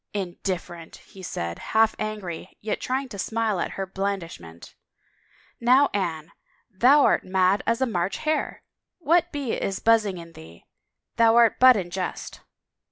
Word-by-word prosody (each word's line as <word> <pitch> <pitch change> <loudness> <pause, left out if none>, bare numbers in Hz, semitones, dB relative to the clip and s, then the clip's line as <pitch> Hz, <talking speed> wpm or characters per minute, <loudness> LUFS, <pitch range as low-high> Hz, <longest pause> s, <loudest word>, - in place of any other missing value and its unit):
" - - -52
Indifferent," 175 -2 -6
he 190 - -14
said, 85 - -5
half 220 0 +2
angry, 210 -6 -6
yet 215 - -4
trying 265 +2 -2
to 200 - -9
smile 220 -2 -1
at - - -3
her 195 - -4
in 190 - -10
blandishment, 170 - -5 0.4
" - - -33
now, 255 +4 +4
Anne, 165 -5 -3 0.4
thou 255 +9 +5
art - - +2
mad 185 +1 +2
as 230 +2 0
a - - +4
March 185 -5 -2
hare. 310 0 -2 0.3
What 345 +1 +2
bee 280 -6 -3
is 195 - -3
buzzing 220 -4 +2
in 170 -1 -11
thee? 80 +1 -15 0.5
Thou 230 0 +5
art 235 -1 +4
but 255 0 +8
in 175 -3 -4
jest." 185 0 -5
200 Hz, 165 wpm, -24 LUFS, 175-235 Hz, 0.5 s, but